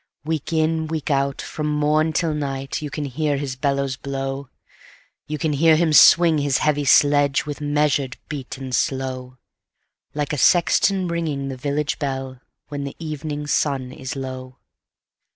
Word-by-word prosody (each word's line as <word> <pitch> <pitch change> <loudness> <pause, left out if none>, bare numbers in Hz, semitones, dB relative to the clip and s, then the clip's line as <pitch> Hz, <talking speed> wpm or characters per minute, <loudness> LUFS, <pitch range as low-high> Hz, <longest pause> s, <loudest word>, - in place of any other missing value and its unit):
Week 160 0 -3
in, 160 0 +1
week 155 -1 -3
out, 140 0 0
from 150 -1 -4
morn 150 +1 +2
till 160 0 0
night, 135 -2 -3
You 150 - -4
can 145 +1 -4
hear 145 +2 -1
his 135 -2 -4
bellows 140 -1 -1
blow; 135 0 -4 0.8
You 150 +1 -3
can 150 +1 -1
hear 160 +2 +5
him 160 -1 +2
swing 165 0 +7
his 140 -2 +1
heavy 145 -1 +1
sledge, 145 0 +4
With 150 0 -6
measured 145 -3 0
beat 140 -4 -6
and 130 -1 -7
slow, 130 -1 -2 0.8
Like 150 0 -2
a 150 - -2
sexton 185 +4 +3
ringing 155 -5 -2
the 135 - -4
village 145 +3 -2
bell, 135 -2 -4 0.3
When 145 -1 -4
the 140 - -6
evening 150 -2 -5
sun 135 -3 0
is 130 +1 -6
low. 130 -1 -7
145 Hz, 155 wpm, -22 LUFS, 135-155 Hz, 0.8 s, swing